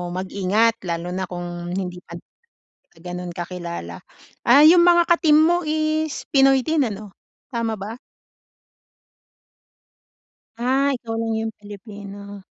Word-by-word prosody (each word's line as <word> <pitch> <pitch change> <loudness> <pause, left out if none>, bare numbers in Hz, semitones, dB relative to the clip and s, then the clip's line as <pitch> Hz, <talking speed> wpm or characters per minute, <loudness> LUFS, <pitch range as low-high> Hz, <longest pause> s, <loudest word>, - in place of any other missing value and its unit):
mag-ingat 200 +5 +1
lalo 170 +1 -3
na 185 0 -3
kung 175 -1 -6
hindi 180 0 -4
pa 170 - -12 0.5
tayo 165 - -27
ganun 180 0 -6
kakilala. 170 - -6 0.5
Ah, 265 +5 +7
yung 345 +2 +7
mga 345 -1 +5
ka-team 330 -3 +4
mo 340 +2 +4
is 310 -1 -1
Pinoy 270 -1 +5
din 315 -2 +1
ano, 210 -2 -6 0.4
tama 230 -1 -1
ba? 210 +4 -7 2.6
Ah, 270 +3 +2
ikaw 230 -2 -6
lang 225 0 -2
yung 225 0 -3
Pilipino. 205 -1 -10
210 Hz, 120 wpm, -22 LUFS, 180-270 Hz, 2.6 s, Ah